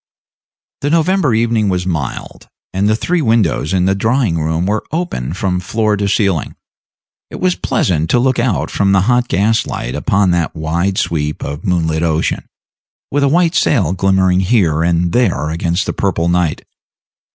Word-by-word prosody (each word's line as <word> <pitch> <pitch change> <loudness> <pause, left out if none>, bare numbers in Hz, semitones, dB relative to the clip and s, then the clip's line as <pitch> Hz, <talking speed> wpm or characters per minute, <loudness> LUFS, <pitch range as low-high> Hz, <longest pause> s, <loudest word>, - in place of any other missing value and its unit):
The 145 - -1
November 165 - +2
evening 115 -2 +1
was 90 -1 -1
mild, 80 -8 -5 0.3
and 100 +2 +1
the 110 - +3
three 175 +9 -1
windows 115 - +1
in 90 -1 +1
the 95 - +2
drawing 110 -3 0
room 80 +2 -1
were 105 +2 -1
open 160 - -3
from 90 0 -1
floor 110 +4 0
to 100 0 -1
ceiling. 100 -5 0 0.7
It - - -9
was 185 0 +2
pleasant 80 - -1
to - - +3
look 130 0 +1
out 120 -5 0
from 100 -1 +1
the 95 - +4
hot 125 +4 +2
gas 110 +3 +1
light - - -4
upon 95 -2 +1
that 85 -2 -1
wide 85 +5 -1
sweep 75 -2 -2
of 70 +3 -6
moonlit 80 -3 0
ocean, 80 -1 -1 0.6
with 145 - +1
a 140 - +3
white 170 +2 +2
sail 95 - +2
glimmering 95 -1 +2
here 90 -6 +2
and 85 0 +1
there 90 -10 +1
against 85 +3 -1
the - - -3
purple 90 -4 -1
night. 85 -3 0
95 Hz, 170 wpm, -16 LUFS, 85-115 Hz, 0.7 s, the